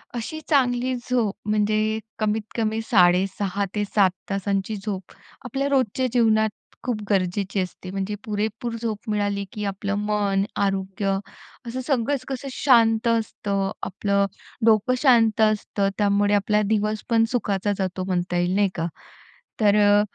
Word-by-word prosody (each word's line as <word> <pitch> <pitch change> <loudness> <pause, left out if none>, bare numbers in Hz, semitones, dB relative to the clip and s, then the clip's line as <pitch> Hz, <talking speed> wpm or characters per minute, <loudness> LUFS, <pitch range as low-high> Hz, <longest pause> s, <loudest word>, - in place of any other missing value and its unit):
अशी 280 +7 -4
चांगली 255 -3 +2
झोप 240 -4 -1
म्हणजे 215 +1 +1 0.2
कमीत 215 0 +1
कमी 220 -1 0
6.5-7 195 +1 +2 0.2
तासांची 195 +1 -1
झोप 195 -4 -4 0.3
आपल्या 270 +3 -1
रोजच्या 260 -2 +1
जीवनात 220 -3 +3 0.3
खूप 240 -4 -2
गरजेची 195 0 0
असते. 185 0 -5
म्हणजे 195 +2 -3
पुरेपूर 220 +2 -3
झोप 220 -2 -4
मिळाली 205 -1 0
की 210 - -5
आपलं 200 0 -2
मन, 200 -2 +1 0.2
आरोग्य 195 0 -1 0.5
असं 255 +3 -3
सगळंच 270 -1 0
कसं 270 0 -5
शांत 230 -4 +4
असतं. 200 -4 0
आपलं 200 +1 0 0.4
डोकं 220 +2 +4
शांत 230 -5 +4
असतं 210 -2 +1
त्यामुळे 205 0 +2
आपला 210 +1 +2
दिवसपण 215 +2 +1
सुखाचा 205 -5 0
जातो 185 -1 -2
म्हणता 180 -1 -1
येईल, 175 +1 +1
नाही 200 -1 +3
का. 165 -1 -1 0.7
तर 205 -1 +5
अ, 205 0 +5
210 Hz, 130 wpm, -24 LUFS, 195-225 Hz, 0.7 s, तर